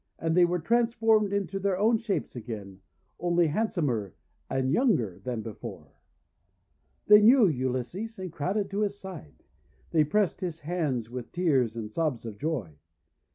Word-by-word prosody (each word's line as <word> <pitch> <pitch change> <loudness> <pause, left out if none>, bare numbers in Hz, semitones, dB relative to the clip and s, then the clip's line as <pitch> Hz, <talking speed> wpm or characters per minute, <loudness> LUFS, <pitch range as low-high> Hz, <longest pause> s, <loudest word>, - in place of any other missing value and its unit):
And 165 0 -1
they 180 -1 +6
were 175 +1 0
transformed 225 +1 +2
into 200 -1 -1
their 195 -1 0
own 220 +3 +3
shapes 210 - -3
again, 105 -5 -7 0.4
only 175 -1 +2
handsomer 150 - -1 0.3
and 130 0 0
younger 145 - +1
than 120 -3 -4
before. 110 -3 -8 1.1
They 210 0 +8
knew 235 +2 +7
Ulysses, 135 - -2
and 185 -2 -6
crowded 195 +6 -2
to 200 - -2
his 200 -1 -1
side. 185 - -10 0.5
They 160 -2 +4
pressed 195 +5 0
his 170 -3 -4
hands 145 -9 -2
with 125 -1 -7
tears 135 -10 +1
and 110 -2 -5
sobs 150 -5 -1
of 105 -3 -7
joy. 115 - -3
165 Hz, 150 wpm, -28 LUFS, 125-200 Hz, 1.1 s, They